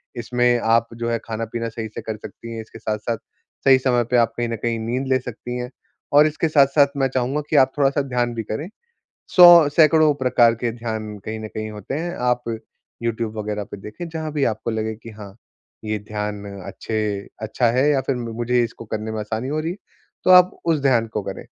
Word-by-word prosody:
इसमें 120 +1 +1
आप 115 0 +2
जो 115 0 -3
है 115 - +1
खाना-पीना 115 +1 -4
सही 115 0 -5
से - - -4
कर 110 -1 -5
सकती 115 +2 -10
हैं, 115 - -5
इसके 115 0 -13
साथ-साथ 110 +1 -2 0.5
सही 135 -1 +7
समय 125 -2 +2
पे 125 - +4
आप 115 -1 +3
कहीं 120 0 0
न 115 - -2
कहीं 115 +1 -2
नींद 120 +4 -2
ले 130 -1 +3
सकती 125 0 -6
हैं। 125 0 -4 0.4
और 150 +2 +7
इसके 155 +2 -1
साथ-साथ 140 -1 +5
मैं 135 -1 +2
चाहूँगा 130 +4 0
कि - - 0
आप 130 - -2
थोड़ा-सा 140 0 +2
ध्यान 125 -3 -1
भी 115 - -3
करे। 110 - -4 0.7
सौ 175 -4 +9
सैकड़ों 155 -1 +5
प्रकार 125 -3 +3
के 115 +1 -2
ध्यान 110 -2 -5
कहीं 110 0 -4
न 110 - -6
कहीं 110 0 -5
होते 105 +3 -7
हैं, 170 +3 -3
आप 125 0 0 0.6
यूट्यूब 115 -1 -2
वगैरह 105 -1 -3
पे - - -6
देखे 105 - -8
जहाँ 160 -1 -5
भी 145 -2 0
आपको 110 +2 -5
लगे 110 0 -2
की, 115 +1 -12
हाँ 105 -3 -11 0.5
ये 110 0 -2
ध्यान 105 0 -5 0.2
अच्छे 105 -2 -3
अच्छा 110 +3 0
है 130 +5 +3
या 140 -2 +2
फिर 135 - +1
मुझे 120 +1 0
इसको 115 0 -7
करने 110 0 -4
में 110 - -4
आसानी 110 +4 -4
हो 150 +2 -1
रही 165 +2 -2
है, 180 - -7 0.5
तो 185 - +6
आप 180 0 +7
उस 165 -3 +2
ध्यान 125 -5 +2
को 110 -1 -3
करें। - - -7
120 Hz, 210 wpm, -22 LUFS, 110-135 Hz, 0.7 s, सौ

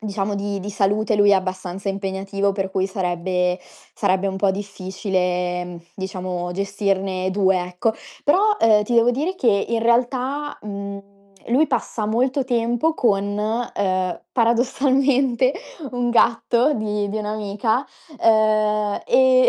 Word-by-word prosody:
diciamo, 205 -1 -2
di 200 0 -3
di 205 +2 -5
salute 205 +2 +1
lui 205 0 +5
è - - +6
abbastanza 185 0 -3
impegnativo. 195 +1 -1
Per 195 -1 -3
cui, 190 0 +1
sarebbe 180 -1 -1 0.4
sarebbe 190 +1 +1
un 190 -1 -2
po' 195 0 +2
difficile, 185 -2 -2
mhmm, 175 -1 -9
diciamo, 185 -2 -4
gestirne 195 -1 -1
2, 190 -1 +2
ecco. 180 +5 -1 0.3
Però, 415 +8 +4
ehm, 215 -2 +5
ti 235 +3 -2
devo 235 +1 +5
dire 310 +9 -2
che, 220 - +2
in 230 -1 0
realtà, 255 +5 0
mhmm, 200 -1 -7 0.4
lui 265 +7 +3
passa 235 -4 -2
molto 255 +5 +1
tempo 240 +5 +1
con, 205 -6 +1 0.4
ehm, 185 -2 -1
paradossalmente, 260 +2 +2 0.4
un 245 0 -1
gatto 235 +3 +3
di 210 -2 -2
di 205 - -3
un'amica. 215 +3 -1 0.4
Ehm, 215 -1 +2
e 255 0 +5
205 Hz, 130 wpm, -21 LUFS, 190-235 Hz, 0.4 s, è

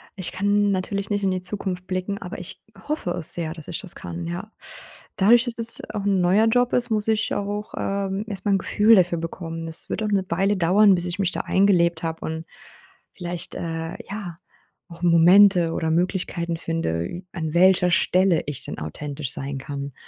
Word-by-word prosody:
Ich 185 -3 -5
kann 205 +1 +1
natürlich 200 +1 -2
nicht 205 -1 -1
in 190 - +2
die 185 0 -2
Zukunft 185 -1 -3
blicken, 185 +2 -3
aber 180 - -6
ich 180 - -9 0.3
hoffe 300 - -2
es 170 -2 +2
sehr, 165 -2 -3
dass 160 -3 -11
ich 170 - -4
das 190 -4 -6
kann, 170 0 -6
ja. 180 +5 -6 0.6
Dadurch, 235 +5 +5
dass 240 -1 -4
es 230 0 -2
auch 210 -2 -4
'n 195 -2 +2
neuer 190 +5 +4
Job 245 +2 +2
ist, 245 -1 +1
muss 215 -1 0
ich 220 -1 +1
auch, 205 +1 -3
ähm, 195 0 -2
erstmal 205 -1 -1
'n - - +4
Gefühl 215 +4 +4
dafür 175 -3 +3
bekommen. 165 0 -5
Es 160 0 -3
wird 220 - -2
auch 215 - -1
'ne 195 -2 +1
Weile 195 +4 +1
dauern, 195 +3 +5
bis 175 -1 -1
ich 175 0 -4
mich 190 -3 0
da - - -4
eingelebt 175 -4 +2
habe 165 0 -4
und 160 +1 -4 0.7
vielleicht, 175 -1 -5
äh, 165 0 -4
ja, 195 -5 -6 0.5
auch 170 -1 -13
Momente 175 +1 +6
oder 160 - -1
Möglichkeiten 170 0 -1
finde, 165 - -2
ü 175 - -7
an 160 -3 -4
welcher 180 0 +5
Stelle 180 0 +3
ich 145 -2 -5
denn - - -6
authentisch 140 - -5
sein 135 0 -5
kann, 140 +1 -6
180 Hz, 195 wpm, -23 LUFS, 165-200 Hz, 0.7 s, Momente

